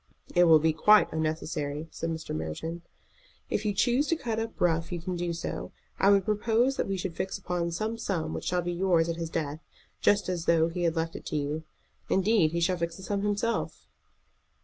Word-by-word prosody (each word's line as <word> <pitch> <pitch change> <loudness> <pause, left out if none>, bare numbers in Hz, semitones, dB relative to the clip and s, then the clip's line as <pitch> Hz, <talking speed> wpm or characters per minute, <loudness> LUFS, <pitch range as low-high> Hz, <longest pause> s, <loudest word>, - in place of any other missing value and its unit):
"It 175 0 +6
will 160 -2 +8
be 160 +1 +2
quite 210 +7 +5
unnecessary," 155 -1 -2
said 165 - -4
Mr. 160 - -4
Merton. 80 - -4 0.7
"If 215 - -1
you 210 - +2
choose 245 +8 +2
to 330 - +2
cut 230 -7 -3
up 225 0 -5
rough 165 -1 +1
you 175 - -2
can 180 +2 -4
do 175 0 -2
so. 170 - -5 0.3
I 195 - +5
would 200 -2 +4
propose 225 +5 +2
that - - 0
we 195 -1 -1
should 180 -2 -4
fix 190 - -3
upon 180 -3 -2
some 215 +7 -3
sum 165 -8 -2
which - - -5
shall 180 -1 0
be 175 0 -2
yours 170 -2 +2
at 165 - -2
his 165 -1 -3
death, 155 -2 -3 0.4
just 205 0 +3
as 175 -2 -2
though 165 -1 +4
he 175 +1 -2
had 165 0 +1
left 165 0 -2
it - - -8
to - - -3
you. 150 +2 -2 0.4
Indeed, 190 -4 +3
he 170 +1 -1
shall 180 +2 +2
fix 170 -1 -3
the 190 - -11
sum 200 0 -1
himself." 205 +3 -1
175 Hz, 215 wpm, -28 LUFS, 160-200 Hz, 0.7 s, will